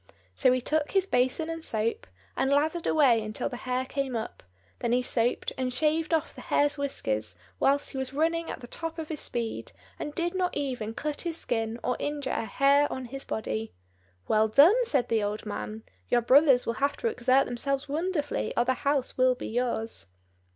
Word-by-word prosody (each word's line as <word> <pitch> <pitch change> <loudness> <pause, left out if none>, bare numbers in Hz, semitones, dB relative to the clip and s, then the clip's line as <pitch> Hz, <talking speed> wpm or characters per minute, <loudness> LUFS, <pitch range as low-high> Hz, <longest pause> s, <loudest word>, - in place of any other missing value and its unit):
So 255 - +3
he 255 0 +1
took 300 +3 -1
his 385 -1 +3
basin 260 0 +1
and 330 -1 -5
soap, 220 - -1 0.3
and 265 - +1
lathered 310 +4 +1
away 260 -7 +4
until 215 0 -3
the - - -6
hare 255 +1 0
came 265 -1 -3
up; 225 -1 -5 0.4
then 235 - 0
he 250 +1 +2
soaped 240 -1 0
and 255 -1 0
shaved 310 +4 +1
off 320 -2 0
the - - -10
hare's 290 0 +2
whiskers 110 - -2 0.2
whilst 280 +1 +2
he 265 - -4
was 265 -1 -3
running 325 +3 0
at - - -6
the 240 - -9
top 330 +5 -5
of 320 -2 -5
his 310 -3 -3
speed, 230 -2 -3 0.3
and 295 - -5
did 345 0 -1
not 365 -3 -1
even 250 -6 -3
cut 300 +1 -3
his 335 -2 -3
skin 225 -3 -2
or 250 - 0
injure 290 -2 -2
a - - -1
hair 280 +6 +3
on 260 - -4
his 270 +3 -6
body. 110 - -4 0.5
"Well 215 0 +3
done!" 325 - +6
said 270 - +2
the 225 -1 +2
old 210 +1 -3
man. 215 +1 -5 0.3
"Your 240 - +3
brothers 265 +1 +5
will 230 - 0
have 280 +1 +1
to 475 - -1
exert 265 - +3
themselves 275 +4 -2
wonderfully, 305 0 -2
or 240 - +3
the 260 - +2
house 275 0 -1
will 255 0 +5
be - - -6
yours." 230 - -2
265 Hz, 200 wpm, -28 LUFS, 235-300 Hz, 0.5 s, done